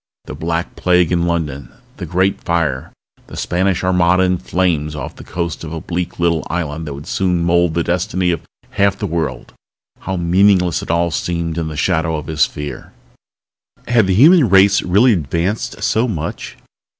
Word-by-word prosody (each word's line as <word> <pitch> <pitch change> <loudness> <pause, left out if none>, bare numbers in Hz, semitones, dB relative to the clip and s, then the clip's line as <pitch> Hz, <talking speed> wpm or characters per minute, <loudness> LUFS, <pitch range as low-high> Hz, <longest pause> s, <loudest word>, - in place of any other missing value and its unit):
The - - -7
Black 85 +1 -3
Plague 90 -2 +2
in 85 -1 +1
London, 75 -7 -3 0.3
the 90 - -6
Great 95 +4 0
Fire, 80 -6 -1 0.4
the - - -10
Spanish 95 +1 0
Armada 90 0 +3
in 90 -1 +1
flames 80 -5 -1
off 75 - -6
the - - -11
coast 85 -2 -4
of 80 - -7
a 80 - -4
bleak 85 +1 -4
little 85 -2 +1
island 80 -2 -3
that 70 - -5
would 70 +1 -10
soon 90 -3 0
mold 85 -1 +2
the 85 - +1
destiny 90 +1 0
of 85 - -2 0.3
half 100 -1 +1
the 105 - -3
world 80 -8 -3 0.5
how 95 -1 -4
meaningless 90 0 +3
it - - -9
all 85 0 +1
seemed 85 -1 -2
in 80 - -2
the 75 -1 -6
shadow 80 0 0
of 75 -1 -5
his 80 -1 +1
fear! 75 0 -8 0.9
Had 115 -5 +3
the 95 - +2
human 150 - +6
race 100 +1 +5
really 105 +7 +4
advanced 85 +5 -2
so 115 +3 +1
much? 80 -8 -5
85 Hz, 175 wpm, -17 LUFS, 80-95 Hz, 0.9 s, human